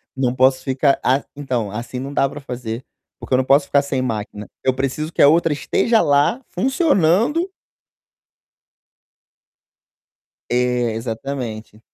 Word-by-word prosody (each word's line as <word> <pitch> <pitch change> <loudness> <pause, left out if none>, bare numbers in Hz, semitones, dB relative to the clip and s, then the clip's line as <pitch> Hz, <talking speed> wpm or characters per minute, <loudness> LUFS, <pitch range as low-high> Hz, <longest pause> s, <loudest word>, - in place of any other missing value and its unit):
Não 130 -2 0
posso 130 +1 +3
ficar 135 +1 +2
a 135 +2 +2
então, 130 -7 -2
assim 120 +4 -6
não 135 +2 -6
dá 135 - +2
pra 150 - -8
fazer, 125 -2 -6 0.3
porque - - -5
eu 130 - +5
não 130 - +2
posso 140 +2 +4
ficar 140 0 +2
sem 135 -2 -2
máquina. 105 -3 -4 0.2
Eu 130 - +2
preciso 135 +4 -3
que - - 0
a - - +8
outra 165 +1 +3
esteja 220 - +1
lá 145 - +2
funcionando 265 - +2 3.0
É, 125 -1 +1
exatamente. 115 -2 -5
135 Hz, 135 wpm, -20 LUFS, 125-145 Hz, 3.0 s, a